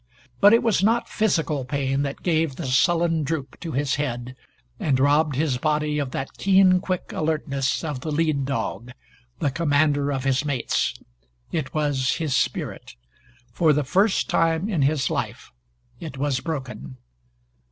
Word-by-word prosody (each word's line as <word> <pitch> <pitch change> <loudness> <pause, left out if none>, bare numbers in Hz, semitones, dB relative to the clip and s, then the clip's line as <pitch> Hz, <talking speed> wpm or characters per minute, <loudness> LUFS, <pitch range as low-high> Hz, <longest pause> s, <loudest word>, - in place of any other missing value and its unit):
But 205 - +7
it 230 - +5
was 225 -5 +2
not 230 +3 +2
physical 160 -9 0
pain 135 +1 -1
that 140 -1 -4
gave 160 -5 +1
the - - -5
sullen 165 +5 +2
droop 145 -3 -4
to 165 -3 -6
his 140 +1 0
head 125 -3 -3 0.4
and 135 -4 +1
robbed 145 +1 +3
his 140 -3 0
body 150 +1 0
of 140 -3 -2
that 135 +1 -6
keen 190 -1 +5
quick 185 -2 -3
alertness 150 -4 -1
of 150 -5 -3
the 155 +4 -5
lead 150 -2 +1
dog 120 -2 -3 0.4
the 145 -4 0
commander 145 -2 +1
of 135 -2 -2
his 135 +1 +1
mates. 140 -5 -1 0.6
It 155 -4 -3
was 145 -4 +1
his 155 -6 -1
spirit. - - -2 0.6
For 160 +2 +3
the 150 +1 +1
first 190 +9 +2
time 165 +3 +1
in 185 -9 0
his 140 0 +1
life, - - -4 0.5
it 155 -5 -7
was 135 -1 0
broken. 130 - -6
145 Hz, 155 wpm, -24 LUFS, 135-165 Hz, 0.6 s, But